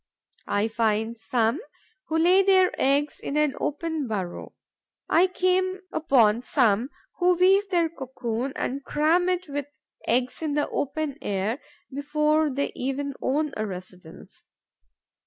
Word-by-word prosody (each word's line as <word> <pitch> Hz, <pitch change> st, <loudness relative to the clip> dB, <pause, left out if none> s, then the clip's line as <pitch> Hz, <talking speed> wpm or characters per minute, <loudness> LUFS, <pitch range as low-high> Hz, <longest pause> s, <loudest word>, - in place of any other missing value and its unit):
I 205 Hz, +2 st, +1 dB
find 225 Hz, 0 st, 0 dB
some 230 Hz, -, 0 dB, 0.5 s
who 320 Hz, -, 0 dB
lay 360 Hz, +4 st, +5 dB
their 375 Hz, -1 st, +4 dB
eggs 285 Hz, +2 st, +1 dB
in 285 Hz, -, -3 dB
an 300 Hz, -2 st, +2 dB
open 310 Hz, -1 st, -2 dB
burrow; 190 Hz, -5 st, -5 dB, 0.5 s
I 350 Hz, +3 st, +4 dB
come 370 Hz, +1 st, 0 dB
upon 235 Hz, -7 st, +3 dB
some 245 Hz, -2 st, +2 dB, 0.3 s
who 360 Hz, 0 st, +4 dB
weave 385 Hz, +3 st, +4 dB
their 345 Hz, -3 st, +2 dB
cocoon 260 Hz, -4 st, -4 dB
and 275 Hz, +2 st, -3 dB
cram 330 Hz, +6 st, +2 dB
it 365 Hz, 0 st, -1 dB
with 285 Hz, -1 st, -4 dB, 0.4 s
eggs 250 Hz, +4 st, 0 dB
in 305 Hz, -3 st, -1 dB
the 295 Hz, -, +1 dB
open 290 Hz, 0 st, -3 dB
air, 205 Hz, +6 st, -2 dB, 0.3 s
before 300 Hz, +2 st, +1 dB
they 280 Hz, +1 st, -2 dB
even 275 Hz, +2 st, -3 dB
own 295 Hz, +3 st, 0 dB
a 215 Hz, 0 st, -2 dB
residence. 180 Hz, -3 st, -10 dB
285 Hz, 135 wpm, -25 LUFS, 235-330 Hz, 0.5 s, lay